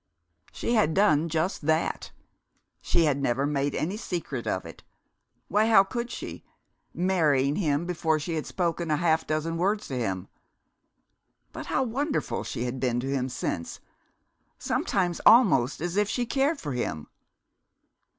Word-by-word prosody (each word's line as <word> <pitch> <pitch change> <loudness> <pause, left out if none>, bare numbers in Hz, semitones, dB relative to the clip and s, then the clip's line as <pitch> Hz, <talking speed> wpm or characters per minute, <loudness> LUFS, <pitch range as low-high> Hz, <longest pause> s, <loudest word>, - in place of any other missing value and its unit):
She 235 - -2
had 205 -9 +2
done 170 -5 +3
just 160 -1 -1
that. 160 +1 0 0.7
She 170 - +2
had 140 -2 +1
never 135 +1 +1
made 145 -1 -1
any 185 +7 -2
secret 165 - -4
of 95 - -1
it 80 - -11 0.7
why, 210 +3 +2
how 215 -4 +7
could 235 +4 -4
she, - - -7 0.5
marrying 155 -6 +2
him 155 -3 0
before 160 -3 0
she 160 +3 -4
had 155 -2 -3
spoken 170 -2 -2
a 150 - +2
half 160 -1 +1
dozen 155 +2 -1
words 205 +5 0
to 135 - -3
him? 95 -4 -2 1.2
But - - -8
how - - +1
wonderful 280 +5 -2
she 120 - -4
had 125 +1 -3
been 125 -2 0
to 135 +2 -3
him 130 -1 -1
since 85 -8 -4 0.8
sometimes 180 -3 -1
almost 185 - +5
as 175 +1 -2
if 210 0 +2
she 245 +2 -1
cared 275 +5 +1
for 145 - -5
him.... 120 - -3
160 Hz, 150 wpm, -27 LUFS, 140-195 Hz, 1.2 s, how